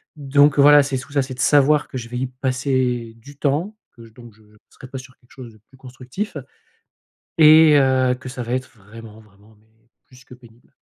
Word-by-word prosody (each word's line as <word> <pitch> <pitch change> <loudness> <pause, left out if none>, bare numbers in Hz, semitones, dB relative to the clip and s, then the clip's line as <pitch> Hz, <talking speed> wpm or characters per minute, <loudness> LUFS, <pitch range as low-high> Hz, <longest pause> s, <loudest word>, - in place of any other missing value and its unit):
Donc 145 0 +2
voilà, 145 0 +6
c'est 135 -1 -4
sous 140 +3 -8
ça, 140 -1 0
c'est 130 0 -7
de 125 - -14
savoir 145 +1 +2
que 130 - -7
je 120 -2 -8
vais 125 +1 -7
y 130 +1 -3
passer 125 -2 -3
du 140 +5 -16
temps, 155 +10 -2 0.2
que 115 -1 -16
je - - -17
donc, 120 -2 -16
je 110 - -26 0.3
serai 130 - -14
pas 135 - -9
sur 130 0 -14
quelque 120 - -31
chose 125 -3 -12
de 110 - -21
plus - - -23
constructif, 135 - -8
heu 135 - -10 0.9
et 155 0 +6
heu, 130 -2 +2
que 130 +1 -11
ça 125 -1 -7
va 120 - -6
être 130 0 -4
vraiment 110 +2 -14
vraiment 105 0 -24
mais, 110 - -31 0.4
plus 130 0 -20
que 125 - -15
pénible. 120 -1 -22
130 Hz, 220 wpm, -19 LUFS, 120-140 Hz, 0.9 s, voilà